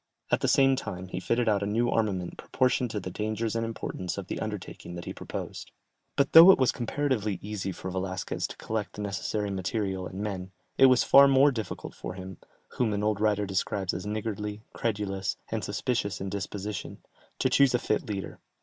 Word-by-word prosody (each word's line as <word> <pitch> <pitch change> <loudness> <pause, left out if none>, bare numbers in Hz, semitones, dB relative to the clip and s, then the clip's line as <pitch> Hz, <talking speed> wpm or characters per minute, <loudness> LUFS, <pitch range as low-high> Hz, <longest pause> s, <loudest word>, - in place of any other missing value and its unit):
At - - +2
the - - +1
same 135 -1 +5
time 95 -7 -6
he - - -3
fitted 120 0 0
out 105 -2 +3
a 100 - -1
new 115 +4 +1
armament 95 -6 0
proportioned 125 -1 0
to 110 - -3
the 90 -1 -6
dangers 110 +3 -2
and 115 - 0
importance 95 -5 -4
of 100 - -4
the - - -4
undertaking 105 -4 -6
that 85 - -7
he - - -5
proposed. - - -6 0.5
But 140 -1 +2
though 165 +3 +11
it 190 - +8
was 130 -2 +3
comparatively 120 -5 -1
easy 100 -2 -4
for 95 +1 -6
Velasquez 95 0 -3
to - - -10
collect 110 -2 -3
the 105 - -5
necessary 105 0 -2
material 95 -1 -2
and 95 - -8
men, 95 -3 -4 0.2
it 135 - +7
was 130 -1 +5
far 140 0 +8
more 135 +1 +5
difficult 110 -7 -5
for - - -7
him 95 -1 -8 0.4
whom 115 -4 +2
an 100 0 -1
old 105 -1 +1
writer 105 -1 +2
describes 95 0 -1
as 95 +3 -5
niggardly, 105 0 -3
credulous, 100 -3 -2
and 110 -1 -2
suspicious 105 -2 -1
in 95 - -4
disposition 100 +1 -5 0.4
to - - +2
choose 140 -3 +5
a - - +5
fit 125 - -1
leader. 100 -3 -4
105 Hz, 195 wpm, -28 LUFS, 95-115 Hz, 0.5 s, though